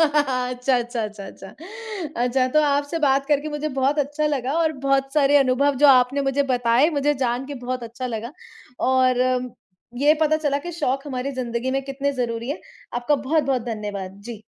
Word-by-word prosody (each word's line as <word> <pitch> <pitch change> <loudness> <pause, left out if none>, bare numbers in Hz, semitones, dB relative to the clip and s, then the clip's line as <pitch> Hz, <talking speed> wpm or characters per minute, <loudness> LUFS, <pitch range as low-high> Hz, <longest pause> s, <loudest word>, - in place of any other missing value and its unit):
अच्छा, 260 -4 +1
अच्छा, 240 -1 -2
अच्छा, 210 -1 -7
अच्छा। 195 0 -12 0.7
अच्छा, 255 +1 +2
तो 305 +4 +3
आपसे 285 +3 0
बात 275 -2 +2
करके 295 +1 +1
मुझे 300 0 -3
बहुत 275 +3 +2
अच्छा 295 +1 0
लगा 270 -3 -1
और 320 -1 +2
बहुत 270 0 +1
सारे 290 -1 +4
अनुभव 275 +1 +3
जो - - +9
आपने 260 +1 +5
मुझे 275 +1 +1
बताए 245 +3 +3
मुझे 295 -1 +1
जान 245 +2 -1
के 285 - -6
बहुत 255 0 -3
अच्छा 235 +2 -6
लगा। 235 +1 -5 0.6
और 255 -1 +3 0.8
ये 295 +3 +5
पता 310 0 +3
चला 290 -3 0
कि 350 - -4
शौक 275 -4 -2
हमारी 260 0 -3
ज़िंदगी 245 -1 -3
में 270 +1 -1
कितने 275 +1 -2
ज़रूरी 235 -2 -3
हैं, 305 - -4 0.3
आपका 245 +5 +1
बहुत-बहुत 275 -2 0
धन्यवाद। 200 -3 -5
जी। 225 -2 -8
270 Hz, 175 wpm, -23 LUFS, 245-285 Hz, 0.8 s, जो